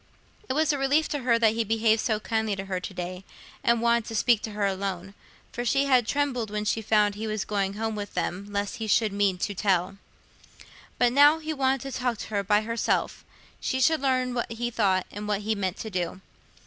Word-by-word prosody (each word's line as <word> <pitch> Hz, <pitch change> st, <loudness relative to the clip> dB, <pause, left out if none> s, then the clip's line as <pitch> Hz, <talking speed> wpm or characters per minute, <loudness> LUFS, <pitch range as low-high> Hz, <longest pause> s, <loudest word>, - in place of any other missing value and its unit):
It -, -, +1 dB
was 310 Hz, +1 st, +2 dB
a 285 Hz, -, -2 dB
relief 285 Hz, +3 st, +2 dB
to 290 Hz, -, -2 dB
her 245 Hz, -3 st, +2 dB
that 225 Hz, -2 st, +3 dB
he 230 Hz, 0 st, 0 dB
behaved 220 Hz, 0 st, +2 dB
so 215 Hz, -2 st, 0 dB
kindly 220 Hz, -1 st, -1 dB
to 195 Hz, 0 st, -6 dB
her 190 Hz, -1 st, -2 dB
to 185 Hz, -, -7 dB
day, 180 Hz, +1 st, -5 dB, 0.4 s
and 235 Hz, -1 st, +3 dB
wanted 235 Hz, -1 st, +3 dB
to 225 Hz, -, -6 dB
speak 230 Hz, 0 st, +3 dB
to 215 Hz, -, -6 dB
her 205 Hz, -1 st, 0 dB
alone; 195 Hz, -1 st, -3 dB, 0.4 s
for 240 Hz, -, -4 dB
she 275 Hz, +4 st, +2 dB
had 255 Hz, -4 st, +3 dB
trembled 265 Hz, -6 st, -1 dB
when 210 Hz, 0 st, -3 dB
she 220 Hz, +1 st, 0 dB
found 210 Hz, -1 st, +2 dB
he 215 Hz, +2 st, -5 dB
was 215 Hz, -1 st, -2 dB
going 200 Hz, -2 st, -1 dB
home 220 Hz, +1 st, -2 dB
with 205 Hz, -1 st, -6 dB
them 190 Hz, +3 st, -2 dB
lest 200 Hz, 0 st, -2 dB
he 225 Hz, -, -4 dB
should 215 Hz, 0 st, +2 dB
mean 200 Hz, -2 st, +1 dB
"to 205 Hz, +3 st, -2 dB
tell." 195 Hz, -1 st, 0 dB, 1.0 s
But, 245 Hz, -1 st, +3 dB
now 290 Hz, +3 st, +7 dB
he 315 Hz, 0 st, -4 dB
wanted 270 Hz, -2 st, +1 dB
to 270 Hz, -, -6 dB
talk 250 Hz, -2 st, 0 dB
to -, -, -7 dB
her 200 Hz, -2 st, -1 dB
by 205 Hz, +2 st, +3 dB
herself, 230 Hz, +1 st, -1 dB, 0.4 s
she 260 Hz, -, -1 dB
should 315 Hz, +3 st, +3 dB
learn 255 Hz, -2 st, +1 dB
what 240 Hz, -1 st, -3 dB
he 240 Hz, +1 st, -3 dB
thought 190 Hz, -5 st, +1 dB
and 210 Hz, +1 st, -6 dB
what 205 Hz, -1 st, 0 dB
he 220 Hz, +1 st, 0 dB
meant 190 Hz, -3 st, -2 dB
to 220 Hz, -, -6 dB
do. 180 Hz, -1 st, -3 dB
220 Hz, 225 wpm, -26 LUFS, 200-245 Hz, 1.0 s, now